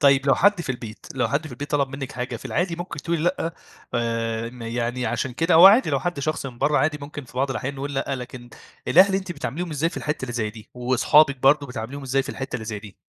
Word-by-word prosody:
طيب 140 -1 +4
لو 135 - +5
حد 205 -1 +3
في 165 - -4
البيت 120 -3 -9
لو 130 - +1
حد 150 +3 -1
في 140 - -9
البيت 145 +4 -7
طلب 140 -2 +1
منِك 135 0 -6
حاجة 125 -1 -4
في - - -13
العادي 175 -1 -1
ممكن 175 -3 -6
تقولِي 170 +2 -1
لأ 175 -1 -1 0.4
آآ، 115 -1 -1
م 125 -1 -11
يعني 120 +1 -2
عشان 120 +2 -2
كده 165 +7 +1
هو 170 +3 +10
عادي 220 +7 +6
لو - - +1
حد 175 -5 -2
شخص 155 -1 -2
من 120 -3 -9
بره 145 +1 +2
عادي 150 +2 +1
ممكن 145 0 -7
في 120 - -17
بعض 135 +1 +1
الأحيان 130 +1 -3
نقُول 140 +1 -5
لأ، 135 0 -1
لكن 125 -1 -9 0.4
الأهل 190 +3 +6
أنتِ 190 -2 -2
بتعامليهم 165 +3 -4
إزاي 155 +3 0
في - - -11
الحتّه 150 -2 -3
اللي 125 -2 -4
زي 110 -3 -1
دي، 110 0 -14
وأصحابِك 130 +4 +4
برضه 140 +2 +4
بتاعمليهم 125 +2 -6
إزاي 135 +1 +1
في 135 - -11
الحتة 135 -1 -5
اللي 110 - -7
زي 110 -1 -4
دي؟ 100 -2 -12
135 Hz, 250 wpm, -24 LUFS, 120-155 Hz, 0.4 s, هو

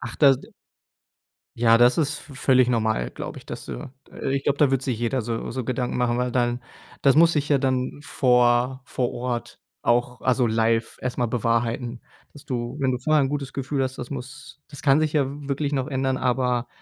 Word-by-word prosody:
Ach, - - -6
das 140 -3 +5
d - - -15 1.1
Ja, 115 -1 +5
das 125 +5 +5
ist 150 0 0
v 140 - -13
völlig 130 -2 +3
normal, 110 - 0
glaube - - -7
ich, - - -16
dass - - -7
du 135 - -7 0.4
ich 135 0 -1
glaub, 140 - +1
da 145 -3 +4
wird 135 -1 +1
sich 125 -4 -2
jeder 120 +2 0
so 115 0 -4
so 130 0 -4
Gedanken 125 0 -2
machen, 120 -1 +1
weil 125 0 0
dann 120 0 0 0.4
das 135 -1 +5
muss 165 +1 +6
sich 150 -1 -1
ja 145 - +4
dann 130 +1 -1
vor 125 -1 +2
vor 125 -1 -2
Ort 120 -1 -4 0.2
auch 120 0 +1
also 125 -1 +2
live 115 0 +1
erst 125 -1 -4
mal 120 - +2
bewahrheiten, 115 +1 -1 0.3
dass 145 - -14
du 120 +1 -4
wenn 130 -2 +2
du 125 - -2
vorher 155 +3 +2
'n - - 0
gutes 140 -1 -4
Gefühl 135 0 -2
hast, 130 0 -3
das 120 - -6
muss 135 +2 -8
das 145 -2 -10
kann 140 +1 +4
sich 155 -1 0
ja 145 -4 +2 0.2
wirklich 140 +1 -1
noch 135 0 -1
ändern, 130 -1 0
aber 125 -1 0
130 Hz, 205 wpm, -24 LUFS, 120-135 Hz, 1.1 s, muss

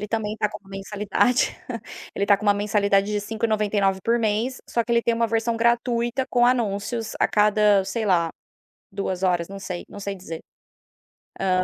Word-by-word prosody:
ele 210 - -4
também 215 0 -2
tá 210 - +1
com - - -8
uma 200 -2 -20
mensalidade. 205 +5 +1 0.6
Ele 200 - 0
está 200 -1 +5
com 210 - -9
uma 205 - +5
mensalidade 200 -1 +2
de 210 - 0
5,99 210 -3 0
por 235 +1 +2
mês. 225 +4 -1
Só 235 - 0
que 235 - -2
ele 235 - +3
tem 235 - +1
uma 230 0 +1
versão 230 +1 0
gratuita 235 +2 +1
com 240 -1 +4
anúncios 225 -1 -1
a - - +4
cada 210 -1 +3
sei 215 +3 -2
lá 170 -4 +2 0.6
2h, 185 -3 -1
não 195 - -8
sei, 180 -2 -5
não 205 - -10
sei 200 0 -3
dizer. 165 -3 -7 1.0
Hã. 185 -1 +2
210 Hz, 180 wpm, -24 LUFS, 195-230 Hz, 1.0 s, está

